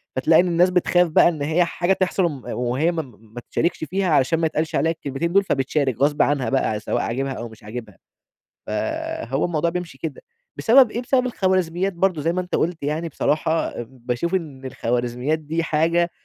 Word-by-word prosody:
فتلاقي 160 Hz, +6 st, +5 dB
إن 180 Hz, -, -1 dB
الناس 175 Hz, +1 st, +3 dB
بتخاف 180 Hz, 0 st, +3 dB
بقى 160 Hz, -, +5 dB
إن 155 Hz, -4 st, -5 dB
هي 160 Hz, +5 st, +2 dB
حاجة 175 Hz, +2 st, 0 dB
تحصل 185 Hz, 0 st, 0 dB
وم 145 Hz, -7 st, -4 dB
وهي 125 Hz, +7 st, 0 dB
م -, -, -6 dB
م 115 Hz, -6 st, -10 dB
ما 120 Hz, -, -7 dB
تشاركش 170 Hz, -1 st, 0 dB
فيها 185 Hz, +5 st, -1 dB
علشان 155 Hz, +1 st, +3 dB
ما 165 Hz, -, +1 dB
يتقالش 155 Hz, 0 st, -2 dB
عليها 160 Hz, +4 st, +2 dB
الكلمتين 160 Hz, +2 st, -3 dB
دول 200 Hz, +1 st, +5 dB
فبتشارك 135 Hz, -, 0 dB
غصب 145 Hz, +1 st, +3 dB
عنها 135 Hz, -5 st, +1 dB
بقى 110 Hz, -5 st, 0 dB
سواء -, -, -1 dB
عاجبها 135 Hz, +3 st, -2 dB
أو 120 Hz, -2 st, -6 dB
مش 110 Hz, -, -16 dB
عاجبها. 110 Hz, -2 st, -8 dB, 0.7 s
فهو 130 Hz, +4 st, -2 dB
الموضوع 170 Hz, -1 st, 0 dB
بيمشي 175 Hz, 0 st, -5 dB
كده. -, -, -6 dB, 0.4 s
بسبب 245 Hz, 0 st, +5 dB
إيه؟ 240 Hz, -, -3 dB
بسبب 255 Hz, 0 st, +1 dB
الخوارزميات 185 Hz, -4 st, 0 dB
برضه 175 Hz, -2 st, 0 dB
زي 165 Hz, +3 st, 0 dB
ما 185 Hz, -, 0 dB
أنت 180 Hz, -, -3 dB
قُلت 165 Hz, -2 st, -1 dB
يعني 155 Hz, +3 st, -2 dB
بصراحة 155 Hz, -2 st, 0 dB
ام 115 Hz, -, -9 dB, 0.2 s
باشوف 130 Hz, +10 st, -1 dB
إن 145 Hz, -7 st, -5 dB
الخوارزميات 125 Hz, +4 st, -1 dB
دي 160 Hz, +2 st, -2 dB
حاجة 165 Hz, +2 st, +1 dB
160 Hz, 190 wpm, -22 LUFS, 135-175 Hz, 0.7 s, فتلاقي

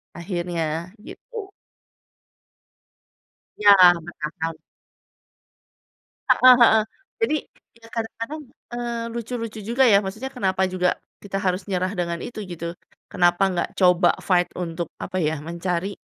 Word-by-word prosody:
Akhirnya, 170 Hz, -1 st, -3 dB
gitu. 445 Hz, -, -9 dB, 2.1 s
Iya, 205 Hz, -1 st, +7 dB, 0.3 s
bertahan. 160 Hz, -1 st, -5 dB, 1.7 s
Heeh 255 Hz, 0 st, +8 dB
heeh. 220 Hz, -2 st, +6 dB, 0.4 s
Jadi, 450 Hz, -9 st, +2 dB, 0.5 s
ya 225 Hz, -, -14 dB
kadang-kadang, 230 Hz, +6 st, -4 dB, 0.3 s
eee, 235 Hz, -1 st, -3 dB
lucu-lucu 230 Hz, -1 st, -5 dB
juga 235 Hz, +6 st, +2 dB
ya, 200 Hz, -2 st, +6 dB
maksudnya 220 Hz, +8 st, -5 dB
kenapa 190 Hz, -5 st, 0 dB
juga 180 Hz, -1 st, 0 dB, 0.3 s
kita 195 Hz, -1 st, -4 dB
harus 185 Hz, -1 st, -1 dB
nyerah 185 Hz, -1 st, 0 dB
dengan 170 Hz, -2 st, -2 dB
itu? 220 Hz, -, -6 dB
Gitu. 170 Hz, -2 st, -6 dB, 0.4 s
Kenapa 175 Hz, +1 st, +3 dB
ga 175 Hz, -, 0 dB
coba 180 Hz, -1 st, +4 dB
fight 180 Hz, -2 st, +2 dB
untuk, 170 Hz, -2 st, -4 dB
apa 185 Hz, -, -4 dB
ya, 155 Hz, -1 st, 0 dB
mencari. 170 Hz, +4 st, -3 dB
185 Hz, 110 wpm, -23 LUFS, 175-225 Hz, 2.1 s, Heeh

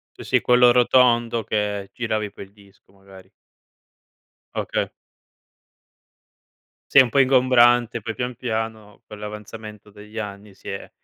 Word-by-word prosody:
Sì, -, -, -10 dB
sì, -, -, +1 dB
quello 125 Hz, 0 st, +5 dB
rotondo 120 Hz, -2 st, +3 dB
che 105 Hz, -2 st, -3 dB
giravi 110 Hz, -3 st, -3 dB
poi 100 Hz, -, -10 dB
il 95 Hz, -, -24 dB
disco, 100 Hz, -2 st, -23 dB
magari. 95 Hz, -1 st, -17 dB, 1.2 s
Oka -, -, -2 dB, 2.0 s
Sì -, -, +7 dB
è -, -, +11 dB
un 125 Hz, -, +1 dB
po' 140 Hz, -, +1 dB
ingombrante, 120 Hz, -3 st, +4 dB
poi 115 Hz, +2 st, -5 dB
pian 125 Hz, +3 st, -4 dB
piano, 110 Hz, -3 st, -5 dB
con 105 Hz, -, -11 dB
l'avanzamento 105 Hz, 0 st, -9 dB
degli 105 Hz, +2 st, -13 dB
anni, 100 Hz, -1 st, -8 dB
si 95 Hz, -, -12 dB
è 95 Hz, -, -7 dB
110 Hz, 135 wpm, -22 LUFS, 105-120 Hz, 2.0 s, è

